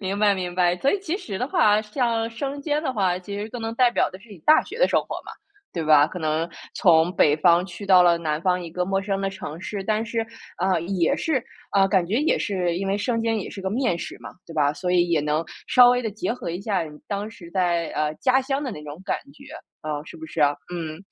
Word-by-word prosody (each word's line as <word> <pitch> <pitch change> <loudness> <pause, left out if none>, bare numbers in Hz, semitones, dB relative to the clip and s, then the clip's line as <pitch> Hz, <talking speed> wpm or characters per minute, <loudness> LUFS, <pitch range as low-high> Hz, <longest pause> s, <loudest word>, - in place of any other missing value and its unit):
明 195 0 -3
白 205 -1 +4
明 180 -2 -4
白。 180 -1 +2
所 275 - +2
以 405 - +1
其 370 -1 -2
实 200 - -6
的 250 - -1
话， 210 -5 +4
像 230 0 -1
生 275 +4 -4
煎 300 +1 -1
的 265 - -1
话， 185 -5 +1
其 200 +2 -7
实 210 +2 -4
更 245 0 -7
能 225 0 -3
代 250 0 +4
表 - - +1
的 185 - -10
是 230 - -18
你 195 - -11
大 310 - +5
学 450 - -9
的 - - +4
生 - - +3
活 - - -6
嘛， - - -9 0.4
对 165 -3 -3
吧？ 150 -1 +6
可 180 - -7
能 160 +1 -1 0.3
从 170 0 +4
北 150 -2 +4
方 170 +2 +4
去 195 +2 -9
到 185 -2 +7
了 170 -1 +4
南 155 -2 -2
方 180 -1 +2
一 170 - -7
个 180 +1 -1
陌 195 +1 0
生 195 0 -2
的 195 0 -1
城 170 -4 -7
市， 195 0 -5
但 215 +1 0
是， 230 -1 -2 0.3
呃， 185 -2 +1
也 175 -2 +1
是 270 -7 0 0.3
呃， 195 -1 +5
感 185 -3 +2
觉 200 - -2
也 300 +4 +2
是 180 -4 -1
因 195 +2 -2
为 195 - +1
生 230 +2 0
煎 225 -1 0
也 200 - -5
是 195 - -8
个 190 - -2
面 235 -7 0
食 - - -6
嘛， - - -9 0.2
对 165 - -10
吧？ 145 -1 +2
所 180 +3 -3
以 175 -1 +3
也 165 -3 +2
能 150 +2 0 0.2
稍 245 -1 +7
微 250 0 +1
地 220 - -2
结 215 +2 -2
合 240 -8 -5
一 175 +3 -4
下 200 -4 0
你 150 -1 -11
当 205 +2 -3
时 175 -7 -13
在， 175 -3 +1
呃， 150 0 -1
家 260 0 +3
乡 275 +2 -2
的 260 - -3
那 150 - -8
种 150 +3 -9
感 - - 0 0.2
觉， - - -16 0.4
呃， 150 -1 -4
是 - - -11
不 160 - -9
是 160 - -5
啊？ 145 -1 +4 0.2
嗯， 160 -3 -4
190 Hz, 285 characters per minute, -24 LUFS, 170-225 Hz, 0.4 s, 到